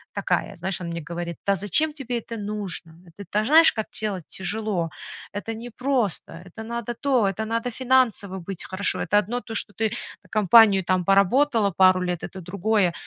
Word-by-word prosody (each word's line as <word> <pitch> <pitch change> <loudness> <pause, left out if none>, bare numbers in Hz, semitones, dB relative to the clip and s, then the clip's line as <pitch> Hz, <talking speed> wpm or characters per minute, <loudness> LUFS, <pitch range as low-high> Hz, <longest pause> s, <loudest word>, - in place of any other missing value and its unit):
такая. - - -1
Знаешь, 190 0 -3
он 170 - -5
мне 170 0 -4
говорит: 170 -1 -5
"Да 200 - +4
зачем 295 - +1
тебе 250 -5 -3
это 230 0 -8
нужно? 200 -6 -5
Это, 185 +5 -11
та 210 +2 0
знаешь, 320 +6 +7
как 220 -1 -3
делать 195 -6 -3
тяжело. 195 -3 -2 0.4
Это 220 +2 -5
непросто, 240 -2 -2
это 190 +5 -10
надо 235 +1 -4
то, 255 -2 +1
это 195 +3 -2
надо 230 +2 -2
финансово 240 -6 +1
быть 185 +1 -4
хорошо. 185 +2 0
Это 205 - +2
одно 235 +5 -3
то, 225 -2 -7
что 205 - +2
ты 220 +2 -1 0.3
на 185 - -23
компанию 210 -1 +6
там 185 +1 +1
поработала 205 +3 +3
пару 185 0 +4
лет, 175 -2 -3
это 190 - -7
другое. 190 0 0
205 Hz, 180 wpm, -24 LUFS, 185-230 Hz, 0.4 s, знаешь